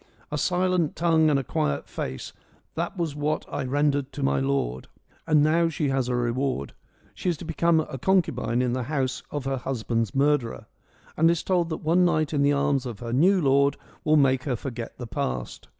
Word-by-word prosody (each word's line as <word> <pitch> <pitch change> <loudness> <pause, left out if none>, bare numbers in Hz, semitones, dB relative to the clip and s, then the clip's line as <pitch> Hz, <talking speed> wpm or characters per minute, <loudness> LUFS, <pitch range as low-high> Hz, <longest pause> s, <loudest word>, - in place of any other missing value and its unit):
A - - -1
silent 180 -3 +1
tongue 160 -1 +3
and 145 - +3
a 135 - -1
quiet 70 - -1
face 65 - -5 0.2
— - - -36
that 170 +4 -3
was 165 -4 -2
what 150 +1 -1
I - - -1
rendered 145 0 0
to 140 - -4
my 135 - +2
lord.' 135 - -1 0.4
And 150 -2 +4
now 165 +2 +3
she 150 -2 -1
has 135 -2 0
her 125 -1 0
reward: 120 - -1 0.4
she 185 - -2
is 170 - -1
to 170 - -9
become 165 0 +2
a 135 -4 -7
concubine 125 -9 +1
in 125 -1 0
the 130 - -1
house 135 -4 -1
of 145 -2 -4
her 135 0 -1
husband's 115 -3 -2
murderer, 140 -4 +1 0.5
and 165 +1 +4
is 170 -1 +1
told 175 -3 +1
that 160 - -5
one 170 +4 +3
night 155 -3 +1
in 145 - +1
the 140 0 +4
arms 140 -2 +1
of 115 -4 -6
her 120 -1 -5
new 185 +9 +4
lord 140 0 +3 0.3
will 155 0 +4
make 130 -3 +3
her 130 -4 0
forget 120 -1 -6
the 120 - -6
past. 65 - -4
140 Hz, 205 wpm, -25 LUFS, 125-160 Hz, 0.5 s, And